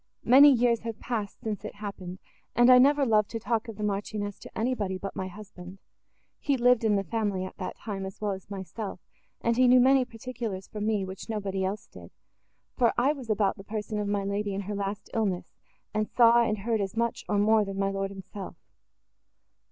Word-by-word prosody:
Many 275 +4 +8
years 240 -2 +3
have 225 -1 -6
passed, 215 -5 -4
since 210 -3 -3
it 215 - -7
happened; 195 -3 -7 0.4
and 240 +1 +6
I 250 - +9
never 280 +2 +5
loved 215 -3 +3
to 225 - -4
talk 230 +1 -1
of 225 -3 -8
the 210 - -4
Marchioness 205 0 -3
to - - -11
anybody, 220 -5 -1
but 195 +1 -6
my 185 - -3
husband. 185 -1 -11 0.6
He 280 -2 +1
lived 245 -1 +4
in 215 -2 +3
the 195 - +1
family, 200 -1 -1
at 185 - -9
that 185 - -5
time, 195 -3 -5
as 190 - -10
well 210 -1 -1
as 190 0 -7
myself, 195 0 -6 0.4
and 235 0 +1
he 255 0 +5
knew 250 +1 +7
many 265 +1 +5
particulars 230 -5 -6
from 210 0 -4
me, 210 -3 +1
which 190 +4 -8
nobody 195 -3 -2
else 195 +3 -3
did; - - -13 0.7
for 240 -3 +3
I 270 +5 +3
was 260 -6 -10
about 205 -2 +1
the 195 - -10
person 210 0 -4
of 205 - -2
my 200 -1 0
lady 200 0 -2
in 200 - -2
her 205 +2 -5
last 200 +1 -4
illness, 200 -6 -1 0.4
and 215 0 -1
saw 235 -1 +6
and 215 -2 +1
heard 220 +1 -1
as 195 +2 -4
much, 235 0 -1
or 205 - +2
more 215 +1 +4
than 195 -1 -5
my 195 0 0
lord 195 0 -2
himself. 195 0 -8
210 Hz, 210 wpm, -28 LUFS, 195-230 Hz, 0.7 s, I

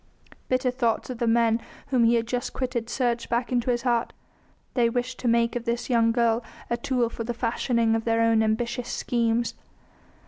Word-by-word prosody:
Bitter 255 0 +1
thoughts 245 -1 -1
of 245 - -7
the 235 - 0
men 230 0 +3 0.3
whom 250 -4 +3
he 235 +1 +4
had 230 -1 +1
just 245 +1 -3
quitted 245 -3 -3
surged 240 -2 -1
back 240 +1 -1
in 245 -1 +2
his 240 0 -1
heart; 240 -2 0 0.6
they 240 -3 +3
wished 245 +1 -3
to 245 - -2
make 235 0 +2
of 240 -1 -3
this 235 +2 -2
young 230 -1 +4
girl 230 -1 +2 0.3
a 235 - +1
tool 245 0 0
for 230 0 -5
the 240 +1 -4
fashioning 235 -1 +1
of 225 0 0
their 230 0 +1
own 225 -1 +4
ambitious 235 +3 -1
schemes. 235 -1 0
235 Hz, 195 wpm, -26 LUFS, 230-245 Hz, 0.6 s, he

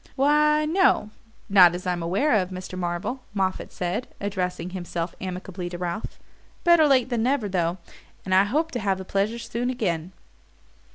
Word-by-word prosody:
"Why, 300 +2 +3
no 320 - +2 0.4
not 185 -4 +7
as 180 - -7
I'm 180 -1 -1
aware 195 - +1
of, 185 -4 +2
Mr. 185 0 -7
Marvell," 180 +8 -3
Moffatt 190 -1 -1
said, 180 +7 -3
addressing 185 -3 -3
himself 175 -2 -4
amicably 185 -1 -5
to 175 - -6
Ralph. 175 +3 -4 0.5
"Better 340 -3 +6
late 260 -3 +3
than 240 -3 0
never, 250 -2 +1
though 175 -2 0 0.5
and 190 - -1
I 190 +1 +6
hope 310 +9 0
to 245 - -3
have 195 -3 0
the 190 - -7
pleasure 200 +5 0
soon 235 +1 -3
again." 180 -9 -2
195 Hz, 165 wpm, -25 LUFS, 180-250 Hz, 0.5 s, not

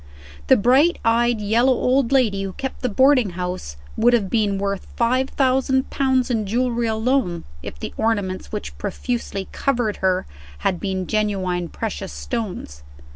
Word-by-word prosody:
The - - +6
bright 265 - +4
eyed 235 0 +3
yellow 230 +5 +3
old 255 0 +1
lady 230 -8 +2
who 195 -1 -4
kept 265 +6 -5
the 250 - 0
boarding 255 -2 +4
house 180 - -4 0.2
would 240 +2 +4
have 205 -6 +1
been 210 -3 +1
worth 200 0 -3
five 255 +3 +1
thousand 265 0 +1
pounds 260 -2 +1
in 220 -4 0
jewelry 240 +1 0
alone, 220 -5 0 0.2
if 70 - -8
the - - -6
ornaments 205 -4 -1
which 210 - -5
profusely 205 -1 -3
covered 240 -6 0
her 185 -1 +1 0.4
had 180 - +1
been 190 -2 -2
genuine 190 -5 -1
precious 205 -3 -5
stones. 190 - -5
225 Hz, 150 wpm, -22 LUFS, 195-250 Hz, 0.4 s, The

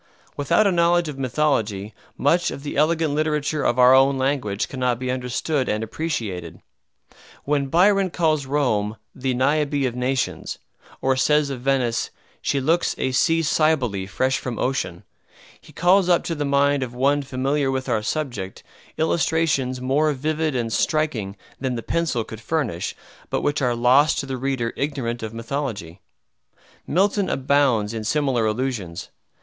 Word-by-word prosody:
Without 145 +9 +2
a 200 - +4
knowledge 170 -1 +3
of 140 -2 -7
mythology 115 -7 0 0.2
much 170 +5 +2
of 140 - -7
the 145 - -5
elegant 155 0 +2
literature 150 -1 0
of 120 - +1
our 125 0 +7
own 135 +1 +5
language 130 -6 -1
cannot 125 -2 -1
be 130 +1 -3
understood 130 +2 -1
and 105 +1 -1
appreciated. 110 - -4 0.8
When 140 -1 0
Byron 190 +5 +3
calls 155 -5 0
Rome 110 -7 0 0.2
"the 130 -1 -2
Niobe 145 +1 +1
of 125 - -1
nations," 125 +1 -2 0.5
or 130 0 +3
says 150 +2 +2
of 130 -3 -5
Venice, 130 -3 0 0.3
"She 140 - 0
looks 165 +6 +1
a 130 - -1
Sea 165 +5 +2
Cybele 140 -12 +1
fresh 130 +7 0
from 120 -3 -5
ocean," 125 -10 -2 0.6
he - - -16
calls 180 +1 +3
up 175 - +4
to 170 - -2
the 150 -2 -2
mind 140 0 +2
of 125 -1 -4
one 140 +3 +2
familiar 135 +1 -1
with 130 0 -2
our 115 -4 +1
subject, 110 -8 -4 0.3
illustrations 155 -5 +1
more 145 +4 +2
vivid 155 +2 -1
and 115 -2 -1
striking 120 -11 0 0.2
than 130 -2 -2
the 115 - -5
pencil 160 -9 -1
could 110 0 -10
furnish, 115 - -2 0.3
but - - -1
which 145 0 0
are 125 -2 +1
lost 130 +6 +4
to - - -2
the 135 -1 -4
reader 130 -3 -2
ignorant 130 -5 -3
of 110 -1 -5
mythology. 115 - -5 0.9
Milton 195 +3 +1
abounds 130 -6 +2
in 110 -1 -4
similar 130 -2 +1
allusions. 105 -7 -3
135 Hz, 155 wpm, -23 LUFS, 120-150 Hz, 0.9 s, our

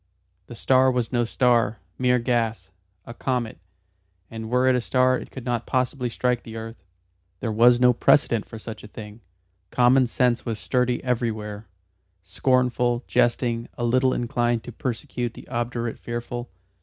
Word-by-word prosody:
The - - -9
star 130 0 +4
was 125 -3 -1
no 120 -2 +1
star 115 -2 +2 0.2
mere 125 -1 +3
gas 115 -5 -1 0.3
a 115 - -8
comet; 120 -5 -2 0.7
and 110 -1 -6
were 125 +1 +2
it 130 - +4
a 125 - +1
star 130 +1 +2
it - - -10
could 130 -3 -9
not 120 -2 -2
possibly 130 -1 0
strike 125 +1 0
the 115 - -10
earth. 115 +1 -8 0.6
There 115 - -2
was 120 +3 +5
no 125 0 +5
precedent 120 -3 +3
for 115 - -9
such 110 0 -8
a - - -9
thing. 105 +1 -10 0.5
Common 125 +3 +4
sense 120 0 +1
was 115 -2 -3
sturdy 125 +1 0
everywhere, 110 -4 -2 0.6
scornful, 125 +4 +1
jesting, 120 -1 +1
a 120 - -3
little 130 +2 +3
inclined 120 -1 0
to 120 - -8
persecute 120 0 -4
the - - -12
obdurate 120 -1 -3
fearful. 120 +1 -5
120 Hz, 155 wpm, -24 LUFS, 115-125 Hz, 0.7 s, was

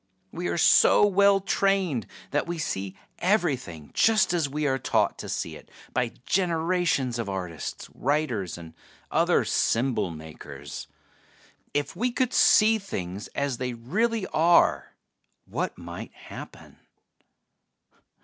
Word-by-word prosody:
We 175 +1 -4
are - - -1
so 170 - +6
well 200 0 +4
trained 195 - 0 0.2
that 145 - 0
we 170 0 -3
see 100 -10 -3 0.2
everything 135 - 0
just 215 -5 +3
as 165 -5 +1
we 150 +2 -2
are 135 -1 +1
taught - - +1
to - - -6
see - - -3
it - - -14 0.2
by 120 -2 0
generations 165 -8 +1
of 110 -4 -3
artists, 90 -5 -5
writers, 125 - -1
and 85 -2 -11 0.4
other - - +3
symbol 120 -4 +1
makers. 75 -3 -9 0.9
If 145 +4 -1
we 245 +7 0
could 250 0 0
see 220 +1 +5
things 100 - -5
as 140 -3 -1
they 125 -1 -2
really 210 - -1
are, 170 +2 +3 0.5
what - - -3
might 85 0 -8
happen?" - - -11
145 Hz, 125 wpm, -26 LUFS, -, 0.9 s, so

